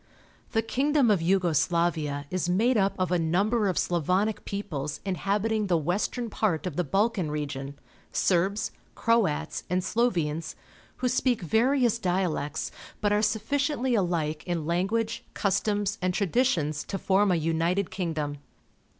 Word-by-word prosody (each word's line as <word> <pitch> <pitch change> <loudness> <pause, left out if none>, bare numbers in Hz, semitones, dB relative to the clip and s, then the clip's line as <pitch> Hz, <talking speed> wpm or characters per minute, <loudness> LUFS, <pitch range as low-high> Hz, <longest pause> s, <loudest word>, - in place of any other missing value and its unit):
— - - -32
The 225 -1 +2
king 275 +6 0
dom 270 -7 +4
of 200 - +3
Yugo 180 0 +2
Slaria 155 -3 0
is 185 -1 -1
made 225 +8 +3
up 195 -2 +2
of 185 -2 -1
a 180 - +2
number 200 +7 +1
of 185 - -1
Slavonic 180 +5 0
peoples 155 -8 -4
inhabiting 205 +4 0
the 175 -3 +3
western 190 - -1
part 205 -7 -1
of 180 -6 -3
the 180 - +1
Balkan 195 - +1
region 145 -2 -4 0.2
— - - -32 0.2
Serbs, 195 +3 +1 0.2
Croats, 225 -10 +1
and 180 +1 +1
Slovenes 170 -9 0 0.2
— - - -27
who - - +5
speak 250 -3 +1
various 235 - +2
dialects, 180 -7 -1 0.3
but 205 -1 +1
are 210 - +3
sufficiently 255 +5 0
alike 170 -7 0
in 170 -3 -1
language, 205 +7 0
customs, 205 +1 0
and 180 0 0
traditions 185 - +1
to 195 - -3
form 195 +1 +2
a - - +3
united 165 +4 0
kingdom. 155 -5 -3
190 Hz, 150 wpm, -27 LUFS, 165-220 Hz, 0.3 s, who